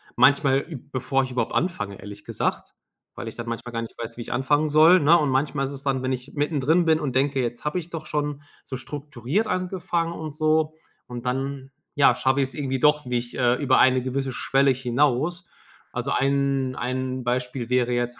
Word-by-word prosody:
manchmal, 135 Hz, +2 st, +4 dB, 0.3 s
bevor 135 Hz, +1 st, +1 dB
ich 130 Hz, -, -5 dB
überhaupt 120 Hz, -3 st, -1 dB
anfange, 105 Hz, -, -2 dB
ehrlich 100 Hz, 0 st, -10 dB
gesagt, -, -, -3 dB, 0.4 s
weil -, -, -7 dB
ich 110 Hz, -, -7 dB
dann 115 Hz, 0 st, -6 dB
manchmal 115 Hz, +1 st, -5 dB
gar 115 Hz, -, -2 dB
nicht 115 Hz, -, -8 dB
weiß, 115 Hz, 0 st, -5 dB
wie 120 Hz, -, -7 dB
ich -, -, -6 dB
anfangen 145 Hz, +4 st, +1 dB
soll, 160 Hz, +4 st, +6 dB
ne? 160 Hz, +4 st, +6 dB
Und 150 Hz, -, +1 dB
manchmal 135 Hz, +1 st, 0 dB
ist 135 Hz, -, -4 dB
es 140 Hz, -1 st, -8 dB
dann 135 Hz, -2 st, 0 dB
wenn 130 Hz, 0 st, -1 dB
ich 125 Hz, +2 st, -6 dB
mittendrin 150 Hz, +3 st, +1 dB
bin 160 Hz, -1 st, +3 dB
und 140 Hz, -4 st, -2 dB
denke: 135 Hz, +1 st, +1 dB
„Jetzt 120 Hz, +1 st, -4 dB
habe 150 Hz, +4 st, -1 dB
ich 175 Hz, -1 st, -5 dB
doch 160 Hz, -2 st, -6 dB
schon 145 Hz, -1 st, -2 dB, 0.2 s
so 130 Hz, -, -6 dB
strukturiert 145 Hz, -, -3 dB
angefangen”, 180 Hz, -3 st, -1 dB
und 155 Hz, -3 st, -6 dB
so, 155 Hz, 0 st, +1 dB, 0.3 s
und 120 Hz, 0 st, -7 dB
dann, 135 Hz, +1 st, -3 dB, 0.2 s
ja, 140 Hz, -, +6 dB
schaffe 130 Hz, +1 st, +1 dB
ich 130 Hz, -, 0 dB
es -, -, -12 dB
irgendwie 135 Hz, -3 st, -2 dB
doch 150 Hz, 0 st, +3 dB
nicht, 120 Hz, 0 st, -2 dB
äh, 125 Hz, -1 st, +3 dB
über 130 Hz, -1 st, +2 dB
eine 130 Hz, -1 st, +4 dB
gewisse 130 Hz, +1 st, -2 dB
Schwelle 135 Hz, +2 st, +2 dB
hinaus. 140 Hz, +7 st, 0 dB, 0.4 s
Also, 125 Hz, +3 st, -3 dB
ein 135 Hz, -1 st, +1 dB
ein 130 Hz, +1 st, -3 dB
Beispiel 125 Hz, 0 st, -2 dB
wäre 125 Hz, -1 st, +2 dB
jetzt: 120 Hz, 0 st, -2 dB
135 Hz, 200 wpm, -24 LUFS, 125-150 Hz, 0.4 s, soll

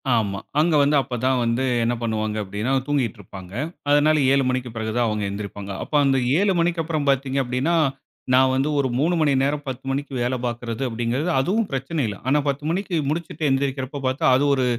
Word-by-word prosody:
ஆமா, 100 Hz, -3 st, 0 dB, 0.2 s
அங்க 160 Hz, 0 st, +3 dB
வந்து, 145 Hz, +1 st, +3 dB
அப்பதான் 130 Hz, 0 st, 0 dB
வந்து 115 Hz, +2 st, 0 dB, 0.2 s
என்ன 120 Hz, +1 st, +1 dB
பண்ணுவாங்க 110 Hz, -2 st, -1 dB
அப்படின்னா? 105 Hz, +6 st, -3 dB, 0.2 s
தூங்கிட்டு 130 Hz, -7 st, 0 dB
இருப்பாங்க. 95 Hz, 0 st, -11 dB, 0.4 s
அதனால 150 Hz, +1 st, +4 dB, 0.2 s
7:00 140 Hz, -1 st, +3 dB
மணிக்குப் 125 Hz, -2 st, -3 dB
பிறகு 110 Hz, -1 st, -3 dB
தான் 120 Hz, -1 st, +2 dB
அவங்க 105 Hz, -1 st, -1 dB
எந்திரிப்பாங்க. 100 Hz, 0 st, -6 dB
அப்ப 150 Hz, -, -5 dB
அந்த 135 Hz, -1 st, +3 dB, 0.2 s
7:00 200 Hz, 0 st, +3 dB
மணிக்கு 170 Hz, -1 st, +1 dB
அப்புறம் 155 Hz, -3 st, -2 dB
பாத்தீங்க 135 Hz, 0 st, +1 dB
அப்படின்னா, 130 Hz, +7 st, 0 dB, 0.6 s
நான் 130 Hz, 0 st, +5 dB
வந்து 135 Hz, +3 st, +1 dB
ஒரு 135 Hz, -, +2 dB
3 170 Hz, +4 st, +2 dB
மணி 145 Hz, -3 st, +3 dB
நேரம் 145 Hz, +1 st, -1 dB
10:00 130 Hz, 0 st, -5 dB
மணிக்கு 140 Hz, +1 st, -3 dB
வேலை 125 Hz, +1 st, 0 dB
பாக்குறது 120 Hz, +1 st, -4 dB
அப்படிங்கிறது, 120 Hz, +7 st, -1 dB
அதுவும் 200 Hz, +10 st, +1 dB
பிரச்சனை 135 Hz, +4 st, -2 dB
இல்ல! 100 Hz, -, -5 dB
ஆனா 145 Hz, +3 st, +3 dB
10:00 140 Hz, +1 st, -3 dB
மணிக்கு 185 Hz, 0 st, -2 dB
முடிச்சிட்டு 155 Hz, -1 st, -2 dB
எந்திருக்குறப்ப 135 Hz, 0 st, -2 dB
பாத்தா 135 Hz, +5 st, -1 dB
அது 145 Hz, -, +1 dB
ஒரு 130 Hz, -, +1 dB
130 Hz, 185 wpm, -23 LUFS, 115-145 Hz, 0.6 s, நான்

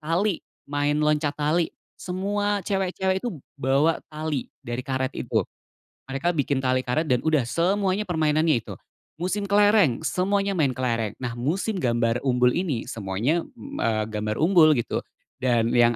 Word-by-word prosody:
tali, 170 Hz, +4 st, 0 dB, 0.3 s
main 145 Hz, +1 st, +1 dB
loncat 150 Hz, -1 st, +2 dB
tali, 155 Hz, +3 st, +1 dB, 0.2 s
semua 205 Hz, +3 st, -1 dB
cewek-cewek 190 Hz, 0 st, 0 dB
itu 240 Hz, -, -1 dB, 0.2 s
bawa 140 Hz, +5 st, +2 dB
tali 155 Hz, -3 st, -3 dB
dari 120 Hz, +1 st, -4 dB
karet 130 Hz, -1 st, -1 dB
itu. -, -, 0 dB, 0.7 s
Mereka 170 Hz, +6 st, 0 dB
bikin 140 Hz, -2 st, +1 dB
tali 130 Hz, -1 st, +1 dB
karet 155 Hz, +7 st, 0 dB
dan 125 Hz, -3 st, +1 dB
udah 155 Hz, -6 st, +2 dB
semuanya 190 Hz, -, +1 dB
permainannya 155 Hz, -, +2 dB
itu. -, -, -9 dB, 0.4 s
Musim 185 Hz, +5 st, -2 dB
kelereng, 205 Hz, -, +4 dB
semuanya 200 Hz, +3 st, +1 dB
main 150 Hz, -9 st, +1 dB
kelereng. 115 Hz, -4 st, -1 dB
Nah 120 Hz, -1 st, -4 dB
musim 185 Hz, -, -1 dB
gambar 120 Hz, -3 st, +1 dB
umbul 125 Hz, -1 st, +4 dB
ini, 155 Hz, -7 st, -1 dB
semuanya, 115 Hz, -, -1 dB
m 280 Hz, +3 st, -8 dB
eee, 110 Hz, -2 st, +1 dB
gambar 105 Hz, 0 st, -2 dB
umbul 160 Hz, -3 st, +6 dB
gitu. 120 Hz, -, -1 dB, 0.4 s
Dan 120 Hz, -2 st, +2 dB
yang 120 Hz, 0 st, +4 dB
150 Hz, 145 wpm, -25 LUFS, 125-185 Hz, 0.7 s, umbul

